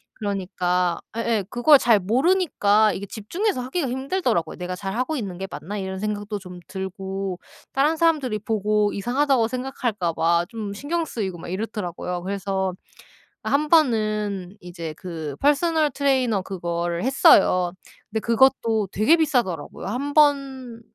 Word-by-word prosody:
그러니까 180 -3 -1 0.2
예예. 230 -3 0
그걸 255 +6 +6
잘 235 -4 +4
모르니까 220 - +3
이게 200 - -5
집중해서 255 - -2
하기가 270 +4 -2
힘들더라고요. 260 - -1
'내가 180 0 -4
잘하고 220 - -2
있는 200 -9 -4
게 190 +1 -5
맞나?' 200 +5 -6
이런 190 -1 -4
생각도 210 0 -3
좀 180 -2 -10
들고 190 0 -5 0.3
다른 290 +4 +2
사람들이 300 -10 +1
보고 210 -1 +1
이상하다고 250 +3 +1
생각할까 245 -7 -2
봐 170 +1 +2
좀 215 -3 -5
신경 320 +10 -2
쓰이고 200 - -4
막 - - -9
이렇더라고요. 180 -3 -4
그래서 190 -1 -2 0.7
어 - - -3
한번은 215 - +1
이제 170 -3 -7
그 160 -6 -6
펄스널 305 +1 +2
트레이너 255 -6 +1
그거를 170 -2 -3
했어요. 185 -8 +5 0.4
근데 220 - 0
그것도 230 -2 +2
되게 220 +11 +4
비싸더라고요. 240 - -1
1 260 +8 -3
번 270 -5 +2
215 Hz, 325 characters per minute, -23 LUFS, 190-265 Hz, 0.7 s, 그걸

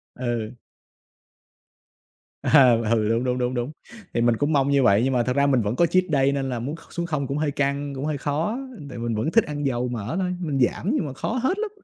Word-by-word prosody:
Ừ. 120 -2 -3 1.9
À, 135 -5 +6 0.2
ừ 110 -2 +2
đúng, 115 +2 +1
đúng, 125 -1 0
đúng, 125 0 -1
đúng. 120 +2 -2 0.4
Thì 120 - +1
mình 120 -1 +3
cũng 145 +4 0
mong 140 -1 +2
như 140 -1 +3
vậy 100 -1 +5
nhưng 135 +1 +1
mà 120 -1 +2
thật 125 +1 -1
ra 140 0 +3
mình 130 -3 +3
vẫn 105 +2 -1
có 170 - +4
cheat 185 +2 +3
day 135 -1 +3
nên 135 -1 -2
là 125 -2 -3
muốn 135 +7 -4
kh 165 - -17
xuống 170 - -2
0 150 -5 -2
cũng 140 - -2
hơi 150 -1 0
căng, 140 0 -1
cũng 135 +2 -4
hơi 155 -1 -1
khó. 155 - -1 0.3
Tại - - -8
mình 115 -1 -2
vẫn 125 +9 -1
thích 230 +2 +5
ăn 145 -1 -5
dầu 125 -2 0
mỡ 115 -2 -4
thôi, 180 -1 -1
mình 150 -6 -2
giảm 145 - +1
nhưng 175 - 0
mà 140 - -5
khó 175 - -3
hết 360 +9 +1
lắm. 440 -1 -2
135 Hz, 250 wpm, -24 LUFS, 120-150 Hz, 1.9 s, À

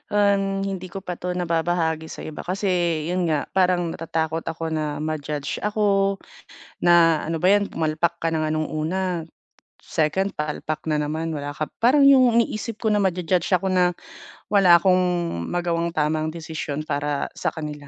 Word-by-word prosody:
Ah, 205 -1 +4 0.3
hindi 185 -1 -5
ko 195 - -4
pa 180 - -2
'to 180 - -5
nababahagi 165 -1 0
sa - - -8
iba 155 - -7
kasi 195 +2 -1 0.4
'yun 180 +1 0
nga, 155 -2 +1 0.2
parang 180 -1 +3
natatakot 160 0 -2
ako 165 0 -4
na 155 - -1 0.2
ma-judge 150 -2 -3 0.2
ako, 210 0 +1 1.0
na 175 0 +7 0.3
ano 165 0 -1
ba - - +5
'yan 205 0 +2
pumalpak 160 +2 0
ka 165 - 0
na 160 - 0
nga 155 0 -1
nong 155 0 -1 0.2
una, 185 +4 -1 1.0
2nd 190 +6 +2
palpak 150 0 -3
na 155 - +1
naman 160 +2 -3
wala 145 0 -4
ka 155 - 0 0.2
parang 275 +4 +5
'yong 265 -2 +7 0.2
iniisip 225 0 -4
ko - - +1
na 210 -1 +2
ma-jujudge 180 -1 0
ako 190 - -3
na 180 - +5 0.7
wala 195 -3 +5
akong 185 +1 +3 0.5
magawang 170 -1 0
tama 150 +1 +1
ang 155 - -4
desisyon 155 -3 -5
para 145 0 -1 0.3
sa - - +1
kanila. 150 -2 -6
165 Hz, 170 wpm, -23 LUFS, 155-185 Hz, 1.0 s, na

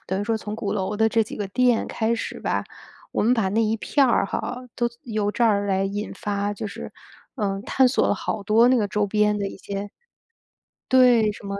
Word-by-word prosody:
等 190 +2 -2
于 - - -2
说 225 0 0
从 210 -1 -6
鼓 215 -2 -3
楼 195 +1 -2
的 220 0 +4
这 225 0 +2
几 - - -8
个 205 -2 -3
店 245 +2 +2
开 225 +1 0
始 - - -5
吧， - - -1 0.5
我 - - 0
们 230 - +3
把 225 -6 +1
那 225 +3 +2
一 220 +1 +1
片 275 +5 +2
儿 235 -5 +2
哈， 250 +5 -4
都 240 -1 0 0.2
由 215 -3 -1
这 235 - +1
儿 205 -2 +2
来 195 0 +1
引 205 +2 -4
发， 205 0 -2
就 210 +1 -5
是， - - -8 0.4
嗯， 195 -3 -2
探 265 +2 +3
索 250 - +2
了 - - +2
好 200 - -4
多 225 +4 +4
那 255 - +4
个 210 -4 0
周 210 +1 0
边 210 0 +1
的 200 - -2
一 - - -10
些 200 +1 -6 1.0
对， 245 -4 +5
什 205 - -13
么， 200 0 -3
210 Hz, 245 characters per minute, -23 LUFS, 200-230 Hz, 1.0 s, 对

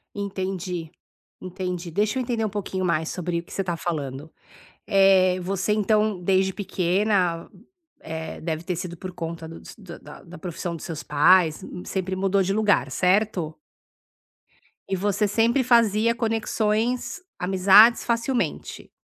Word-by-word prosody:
Entendi, 185 -4 -4 0.5
entendi, 180 -1 -5
deixa 210 +8 0
eu - - 0
entender 235 -3 -2
um 215 - 0
pouquinho 195 -2 -4
mais 160 -3 0
sobre 175 -1 -3
o - - -8
que - - -14
você - - -1
está 175 -3 -3
falando, 150 -3 -4 0.6
eh, 190 -2 +4
você 195 +3 -1
então, 215 -1 +1
desde 190 +1 +2
pequena, 185 -2 0 0.5
eh, 160 0 -6
deve 160 0 -4
ter 180 0 -3
sido 175 0 -5
por 185 +2 -7
conta 165 -2 -6
do 165 - -9
s - - -12
da 180 -4 -12
da 180 +1 -12
profissão 175 0 -5
dos - - -9
seus 160 -2 -6
pais, 160 +3 +4 0.2
sempre 190 -1 -3
mudou 195 +1 +1
de 190 +1 0
lugar, 210 -1 +2
certo? 185 -3 +1 1.4
E 195 - 0
você 205 +2 0
sempre 230 +5 +2
fazia 230 -2 +3
conexões, 225 - -1 0.2
amizades 195 +5 +6
facilmente? 235 +2 -2
190 Hz, 140 wpm, -24 LUFS, 175-210 Hz, 1.4 s, amizades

